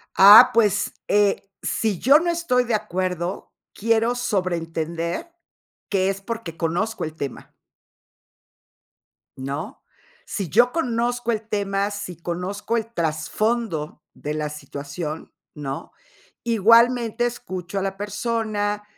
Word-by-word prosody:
Ah, 200 +3 +10
pues, 210 -3 +2
eh, 205 -1 +3 0.2
sí 210 -6 -1
yo 280 +3 +6
no 345 +1 -1
estoy 330 -8 +1
de 235 - -1
acuerdo, 185 -3 -3 0.2
quiero 230 +2 +1
sobrentender 170 - -2 0.6
que 195 -1 +2
es 195 0 -3
porque 215 -7 -6
conozco 175 +8 -1
el 155 0 -5
tema. 140 -4 -7 1.8
¿No? 140 - -5 0.4
Sí 195 -5 -4
yo 240 +8 +4
conozco 245 -5 0
el 220 -1 -3
tema, 200 -1 0
sí 205 -4 -6
conozco 180 +6 -3
el 230 +1 -4
trasfondo 165 0 -1
de 150 +1 -5
la 150 -1 -2
situación, 150 +2 -6 0.2
¿no? 140 -2 -6 0.5
Igualmente 235 +1 +4
escucho 185 -5 -5
a - - -3
la 195 0 -2
persona, 210 0 -2
200 Hz, 115 wpm, -23 LUFS, 170-230 Hz, 1.8 s, Ah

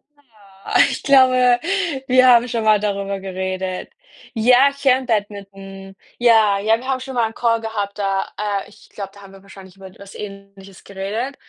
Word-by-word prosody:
Na 290 - -30 0.5
ja. - - +7
Ich - - -5
glaube, 255 -2 +4 0.5
wir 255 0 +5
haben 240 -1 +5
schon 230 -2 -3
mal 215 -1 +4
darüber 200 -1 -3
geredet. 185 -1 -5 0.4
Ja, 250 +4 +4
ich 280 0 -14
kenne 260 -1 +2
Badminton. 195 -3 -5 0.2
Ja, 220 -4 +4
ja, 220 +3 +2
wir 255 +3 -11
haben 265 -1 -1
schon 265 0 -8
mal 235 -2 +1
'n 220 - -11
Call 230 -1 0
gehabt, 210 -2 -5
da 195 -1 -1
äh, 205 -1 -3
ich 205 - -20
glaube, 195 -2 -8
da 200 - -16
haben 195 -1 -15
wir 195 - -15
wahrscheinlich 190 -1 -15
über 190 -1 -13
was 200 0 -13
Ähnliches 200 -1 -11
geredet. 205 +8 -5
205 Hz, 185 wpm, -19 LUFS, 195-240 Hz, 0.5 s, ja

